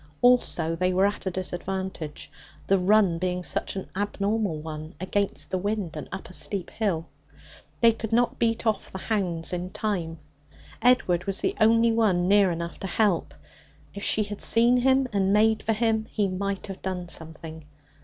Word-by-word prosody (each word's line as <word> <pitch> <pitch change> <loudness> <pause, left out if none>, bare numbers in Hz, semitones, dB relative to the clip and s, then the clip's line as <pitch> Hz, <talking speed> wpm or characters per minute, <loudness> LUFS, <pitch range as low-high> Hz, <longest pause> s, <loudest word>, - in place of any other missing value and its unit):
Also, 245 -9 +3
they 180 +2 +1
were 190 +2 +3
at 205 -1 -2
a - - +3
disadvantage, 185 -3 -4 0.3
the 195 0 +3
run 190 -2 +3
being 180 0 -2
such - - -1
an 190 - -5
abnormal 205 -2 -1
one 155 +2 -7
against 195 +2 -2
the 185 - 0
wind 200 -4 -2
and 150 - -7
up 190 - -6
a 185 - -13
steep 190 -1 -3
hill. 185 -7 -1 0.8
They 230 -1 +7
could 220 -1 -6
not 240 +1 +1
beat 230 0 0
off 220 -1 -1
the - - -6
hounds 185 -5 -2
in 180 +1 -3
time. 180 -6 -3 0.6
Edward 200 -8 +3
was 195 -1 0
the - - 0
only 230 +1 +5
one 200 -6 +2
near 200 -1 +5
enough 170 0 -5
to 195 - -4
help. 195 -3 0 0.6
If 200 - -7
she 215 - +2
had 205 0 -6
seen 235 +2 +5
him 265 +1 +3
and 195 -1 +2
made 220 +1 +3
for 225 - 0
him, 220 0 0
he 205 -2 0
might 195 +1 -3
have 195 -2 -8
done 185 -2 -4
something. 160 -1 -7
195 Hz, 175 wpm, -26 LUFS, 180-220 Hz, 0.8 s, They